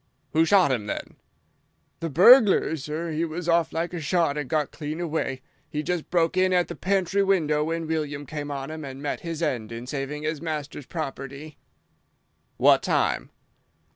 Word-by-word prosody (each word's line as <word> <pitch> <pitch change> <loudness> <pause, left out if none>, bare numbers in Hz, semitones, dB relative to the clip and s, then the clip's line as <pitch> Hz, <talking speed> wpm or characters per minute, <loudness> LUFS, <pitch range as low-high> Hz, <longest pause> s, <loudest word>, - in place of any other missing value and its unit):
"Who 160 +1 +4
shot 185 -5 +5
him, 110 -5 -1
then?" - - -5 0.8
"The 165 - -3
burglar, 195 - +6
sir. 155 +3 -4
He 155 +1 -1
was 170 +1 -4
off 170 -1 +3
like 170 +2 -2
a 175 - -4
shot 160 -1 +1
and 145 -3 -4
got 155 -2 0
clean 155 +1 -5
away. 150 -6 -2 0.3
He'd 150 -1 -3
just 180 -3 -2
broke 170 -1 +2
in 185 0 +3
at 180 -1 +2
the - - -5
pantry 195 0 +1
window 160 -7 +2
when 165 +1 -2
William 150 -2 -3
came 145 0 -5
on 140 0 -5
him 160 0 -6
and 135 -1 -7
met 145 0 -3
his 165 -1 -4
end 120 -8 -2
in 115 +1 -6
saving 145 +2 -4
his 155 -1 -2
master's 150 -4 -5
property." 140 -1 -6 1.0
"What - - +5
time?" - - 0
155 Hz, 175 wpm, -25 LUFS, 145-170 Hz, 1.0 s, burglar